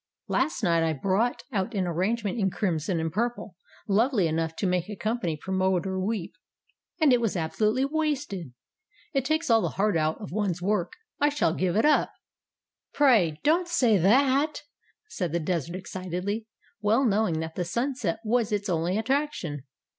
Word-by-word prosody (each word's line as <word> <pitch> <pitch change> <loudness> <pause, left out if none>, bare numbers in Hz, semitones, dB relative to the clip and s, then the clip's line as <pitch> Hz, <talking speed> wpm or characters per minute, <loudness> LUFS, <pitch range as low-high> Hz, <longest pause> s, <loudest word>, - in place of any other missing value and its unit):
Last 265 -2 0
night 170 -3 +3
I 165 -1 +1
brought 195 - 0
out 210 +1 -2
an 190 -2 +1
arrangement 200 +5 -1
in 195 -2 +2
crimson 175 -3 -1
and 160 0 -2
purple, 230 -3 -2 0.3
lovely 215 0 +2
enough 160 0 -1
to - - -2
make 180 0 0
a 210 - -5
company 205 -7 -2
promoter 190 +1 0
weep, 195 -2 -2 0.7
and 300 -5 +5
it 245 - +3
was 220 -5 0
absolutely 215 +10 +1
wasted. 285 - -2 0.6
It 270 -2 0
takes 315 -3 +1
all 225 -1 +5
the - - 0
heart 205 0 +2
out 155 0 0
of - - -8
one's 195 -3 -1
work. 185 -1 -1 0.3
I 290 - +4
shall 290 - +1
give 180 0 0
it 220 - +3
up." 300 - +3 0.8
"Pray 215 - +4
don't 335 +5 +3
say 250 -11 +3
that," 270 - +3 0.4
said 180 - -3
the 170 - +1
Desert 170 0 -2
excitedly, 185 +3 -4 0.3
well 220 +6 +3
knowing 205 -7 +1
that 160 0 -4
the 180 - -2
Sunset 235 0 -2
was 230 0 +1
its 205 -1 -1
only 175 +2 0
attraction. 225 - -2
200 Hz, 165 wpm, -27 LUFS, 175-240 Hz, 0.8 s, and